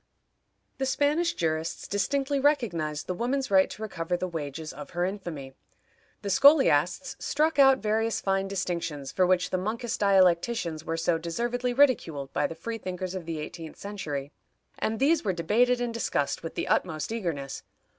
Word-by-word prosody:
The 265 - 0
Spanish 295 +6 +1
jurists 160 0 -2
distinctly 275 +7 0
recognized 190 - 0
the 185 - -2
woman's 255 +4 -1
right 190 -1 +5
to - - -9
recover 175 -4 -2
the 185 - -2
wages 155 -2 -5
of 145 +1 -9
her 175 - +2
infamy. 170 -9 -5 0.7
The 200 - -3
scholiasts 265 - +4
struck 310 +1 +1
out 270 -1 +7
various 220 +1 +1
fine 195 0 0
distinctions, 170 -7 -3
for 185 +3 +2
which 180 -1 +2
the 185 - 0
monkish 230 +5 -2
dialecticians 185 -3 +2
were 165 0 -3
so 165 0 +1
deservedly 240 +9 -2
ridiculed 185 - +2
by - - +1
the 165 - -8
free 225 +7 -5
thinkers 185 -1 -4
of 185 -3 -6
the 165 -1 -3
eighteenth 160 +1 -7
century, 150 -9 -5 0.5
and 220 0 -1
these 295 +4 +3
were 195 -4 0
debated 235 +9 +2
and 240 -1 -2
discussed 145 -10 -1
with 165 - -7
the - - -2
utmost 155 +6 0
eagerness. 160 -11 -3
190 Hz, 165 wpm, -27 LUFS, 165-240 Hz, 0.7 s, out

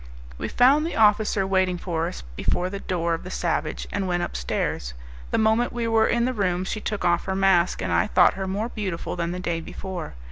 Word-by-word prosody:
We - - -2
found 270 +5 +4
the 330 - -3
officer 210 -2 +3
waiting 190 -1 +1
for 170 -2 -2
us 180 - -7
before 180 - -1
the 200 - -4
door 170 -3 -1
of 165 - -2
"The 185 - -7
Savage," 165 -4 -2
and 200 -2 -1
went 175 -1 0
upstairs. - - -3 0.3
The - - 0
moment 220 +2 +2
we 235 -1 -2
were 225 -1 +3
in 235 0 +2
the 255 - 0
room, 185 -5 0
she 210 +3 -4
took 210 -1 -3
off 175 -1 +2
her 190 - -2
mask, 190 - +3
and 90 - -2
I 85 +1 +3
thought - - +5
her 190 0 -4
more 205 +5 -2
beautiful 190 -9 -4
than 170 -1 -2
the 180 - -4
day 170 -2 -2
before. 180 - -6
190 Hz, 220 wpm, -24 LUFS, 175-215 Hz, 0.3 s, thought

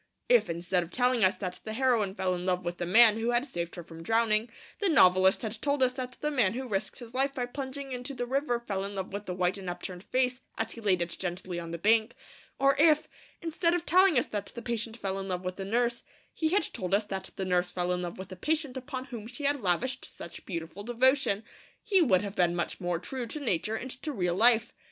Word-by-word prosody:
If, - - +5
instead 175 +2 0
of 170 - -6
telling 250 +1 +2
us 185 +1 +4
that 185 -3 -5
the 220 - -5
heroine 230 -6 +2
fell 185 -3 0
in 180 0 -3
love 180 -1 0
with 175 0 -3
the 175 - -2
man 220 +3 +7
who 230 +1 0
had 240 +2 +2
saved 170 - -5
her 175 - -7
from 165 0 -11
drowning, 225 +4 +2 0.3
the 405 - +2
novelist 185 - +5
had 220 0 -4
told 285 -2 +1
us 255 0 +3
that 255 -1 -5
the 300 - 0
man 225 -9 +2
who 260 +2 -4
risked 205 -2 -2
his 240 -2 -11
life 275 +2 0
by 250 - -1
plunging 270 +2 -5
into 250 +2 -5
the 245 - -2
river 260 -1 0
fell 200 -5 -3
in 200 +1 -5
love 190 0 -4
with 205 +1 -5
the 180 - -3
white 180 +2 0
and 185 -2 -5
upturned 175 +1 -6
face 255 +1 0 0.2
as 225 0 -1
he 230 - -7
laid 185 -5 +2
it 170 - -5
gently 180 -1 -3
on 170 -1 -6
the 170 - -4
bank; 220 +5 +3 0.4
or 275 0 +4
if, 310 -1 +5 0.4
instead 335 +1 +1
of 350 -1 -2
telling 370 -2 +5
us 245 - +3
that 205 -2 -4
the 235 - -7
patient 230 -1 -3
fell 195 -3 -3
in 195 - -5
love 180 -1 -3
with 185 0 -3
the 195 - -4
nurse, 235 +3 0 0.3
he 315 - 0
had 380 +1 +3
told 185 +1 0
us 210 - +2
that 190 -2 -5
the 190 - -3
nurse 180 -1 +1
fell 180 0 -1
in 180 - -2
love 175 -1 -5
with 190 0 -8
the 185 - -7
patient 300 - -1
upon 260 0 -5
whom 235 -5 -7
she 250 +4 -8
had 285 -1 +1
lavished 200 +8 0
such - - -9
beautiful 170 +1 -5
devotion, 240 -1 +2 0.4
he 390 -3 +3
would 205 - +4
have 200 0 -5
been 175 -1 +2
much 175 - -3
more 175 -1 0
true 245 +7 -5
to 305 - -6
nature 220 - 0
and 255 +3 -4
to 300 +4 -5
real 180 -9 0
life. 230 +3 +4
220 Hz, 250 wpm, -29 LUFS, 185-260 Hz, 0.4 s, man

